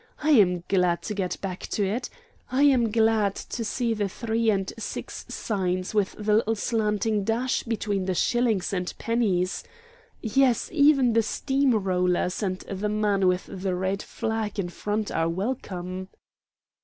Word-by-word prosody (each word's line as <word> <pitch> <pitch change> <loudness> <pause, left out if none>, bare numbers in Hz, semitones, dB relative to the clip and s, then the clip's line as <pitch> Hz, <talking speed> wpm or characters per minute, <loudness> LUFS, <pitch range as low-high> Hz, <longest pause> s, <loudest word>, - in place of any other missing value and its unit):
I 310 - +3
am 180 - +4
glad 180 -3 +2
to 215 - -3
get 190 -3 -2
back 185 -2 -4
to 205 - 0
it 235 +6 -2 0.4
I 265 +3 +3
am 255 -5 +4
glad 220 -2 +2
to 235 - -5
see 230 +1 -1
the 205 -2 -1
three 225 +2 0
and 195 -2 0
six 205 - -6
signs 185 -3 -2
with 205 -2 +1
the 210 0 0
little 225 0 +1
slanting 215 -1 0
dash 235 +5 0
between 205 -4 -2
the 185 -1 -1
shillings 230 -3 +1
and 180 -1 -1
pennies. 200 -6 0 0.6
Yes, 245 +1 +2
even 285 -5 +5
the 230 - +4
steam 265 +3 +1
rollers 180 -2 0
and 185 -3 -1
the 200 +2 -3
man 205 -2 +2
with 180 0 +1
the 190 -1 -3
red 190 +2 -1
flag 220 -2 -3
in 185 -3 -1
front 210 +4 -3
are 165 0 +1
welcome." 185 -2 -4
210 Hz, 155 wpm, -26 LUFS, 185-230 Hz, 0.6 s, even